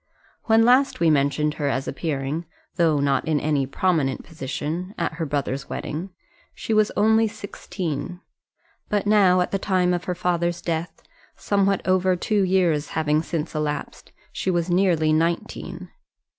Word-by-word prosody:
When 225 0 +4
last 255 +3 +4
we 165 -1 +4
mentioned 145 +1 +1
her 145 - +1
as 135 0 -2
appearing, 150 +1 -3 0.3
though 165 -4 +3
not 140 -1 +1
in 155 -2 +2
any 145 -3 0
prominent 145 -3 0
position, 160 +5 -5
at - - -1
her 160 - -1
brother's 140 -1 -3
wedding, 165 +6 -4 0.5
she 225 - -3
was 215 -1 +3
only 220 +2 +4
sixteen; 180 -6 -5 0.7
but 205 -1 0
now, 195 -4 +4
at 180 - -1
the 195 - 0
time 185 -2 +1
of 175 0 -2
her 180 - -2
father's 175 -1 0
death, 165 0 -4 0.3
somewhat 200 -1 0
over 185 0 +3
two 205 +3 0
years 180 -5 +2
having 155 -1 +2
since 160 -1 -4
elapsed, 150 -2 -4 0.2
she - - -2
was 175 -1 0
nearly 175 -4 +3
nineteen. 170 +2 -2
170 Hz, 150 wpm, -23 LUFS, 150-190 Hz, 0.7 s, When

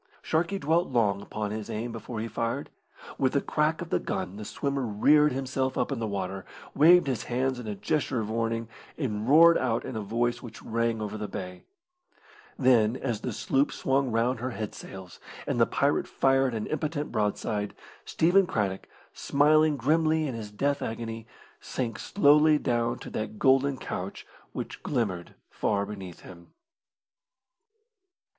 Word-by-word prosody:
Sharkey 170 +5 0
dwelt 165 +1 +1
long 100 -4 +1
upon 105 0 -4
his 110 0 -5
aim 115 +2 -3
before 115 0 -6
he 115 - -3
fired. 115 +1 -3 0.5
With 130 -1 +2
the 140 - +3
crack 155 +3 0
of 170 - -12
the - - +2
gun 95 0 -4
the 105 - -7
swimmer 140 +4 -2
reared 145 +7 +4
himself 130 0 -2
up - - 0
in 135 - -2
the 115 - -2
water, 95 -1 -4 0.3
waved 170 +4 +6
his 130 -4 -2
hands 130 +1 -1
in 120 - -7
a 105 - -3
gesture 130 +2 -1
of 110 - -2
warning, 115 0 -1 0.3
and 110 -5 -2
roared 165 +3 +7
out 120 -2 -1
in 130 - -6
a 110 - -2
voice 120 +3 -1
which 115 -2 -10
rang 115 -1 -1
over 105 +1 -5
the 105 - -3
bay. 90 -2 -7 0.9
Then, 120 -4 +4
as 120 -5 -3
the 125 - -3
sloop 135 +5 +1
swung 135 -1 0
round 115 +2 +1
her 125 +2 -2
head 110 -4 -5
sails, 95 -2 -10 0.3
and - - 0
the - - +5
pirate - - +1
fired 135 -2 +2
an 110 - -2
impotent 150 0 -3
broadside, 105 0 -1 0.3
Stephen 180 +3 +3
Craddock, 100 -6 -2 0.2
smiling 150 +1 +3
grimly 155 +4 +2
in 130 - -3
his 110 -2 -6
death 140 +7 -1
agony, 115 0 -5 0.3
sank 120 -3 -4
slowly 150 -4 +5
down 120 -4 0
to - - -9
that 110 0 -4
golden 135 +2 +3
couch 95 -4 -6 0.3
which - - -6
glimmered 100 -10 -2 0.2
far 100 -1 0
beneath 95 -4 -8
him. 85 -2 -14
120 Hz, 165 wpm, -28 LUFS, 105-140 Hz, 0.9 s, roared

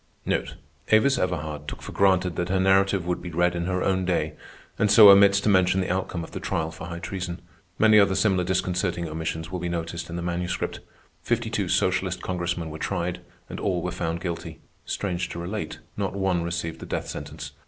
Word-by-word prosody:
Avis 120 +5 +4
Everhard 75 -5 -3
took - - -7
for - - -7
granted 95 -3 +2
that 90 0 -2
her 95 0 +1
narrative 95 -1 +3
would 90 0 -2
be 90 - -6
read 85 +1 +1
in 85 0 -2
her 90 0 -1
own 95 -1 +1
day, 90 -1 0 0.5
and 105 - +3
so 105 -1 +10
omits 100 0 +7
to - - -2
mention 95 -2 +4
the 95 - -1
outcome 90 -2 -3
of - - -10
the - - -5
trial 80 0 -2
for 80 0 -8
high 85 -1 -6
treason. 90 0 -5 0.4
Many 110 -1 +6
other 100 -1 +4
similar 95 -1 +2
disconcerting 90 -1 -1
omissions 80 +1 -4
will 90 - -3
be 85 - -3
noticed 85 0 -4
in 85 - -5
the 85 - -3
Manuscript. 90 0 -2 0.4
Fifty 120 -1 -1
two 100 -5 -1
socialist 95 0 +1
Congressmen 85 -3 -2
were 80 - -7
tried, 90 +2 -2 0.3
and - - -7
all - - -1
were - - -2
found 85 0 -3
guilty. 85 -2 -5 0.3
Strange 90 -3 -2
to - - -7
relate, 95 +5 -4 0.2
not 100 -1 -2
one 95 -3 +1
received 85 -1 -3
the - - -8
death - - -3
sentence. - - -7
90 Hz, 200 wpm, -25 LUFS, 85-95 Hz, 0.5 s, so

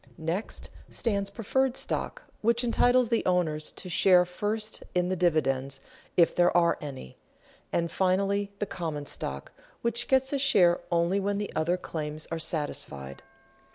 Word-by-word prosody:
Next 165 +7 -4 0.2
stands 200 -4 -1
preferred 250 +5 0
stock, - - -3 0.2
which 235 +2 +3
entitles 245 0 +3
the 230 - +1
owners 160 -4 0
to - - -9
share 180 0 +5
first 210 +4 -3
in 180 0 +2
the 185 - 0
dividends, 135 -6 +1 0.4
if 170 -2 +5
there 175 0 +4
are 170 -1 +3
any; 135 - -8 0.5
and 170 -1 0
finally 200 +2 +1
the 205 - -1
common 160 -6 -4
stock, 70 - -4 0.3
which 235 +1 0
gets 265 +1 +2
a 280 - +1
share 190 -11 +4
only 170 +3 +2
when 200 +1 -1
the 205 0 -4
other 170 +3 +1
claims 155 -3 -5
are 165 - -2
satisfied. 70 - -4
180 Hz, 150 wpm, -28 LUFS, 160-210 Hz, 0.5 s, share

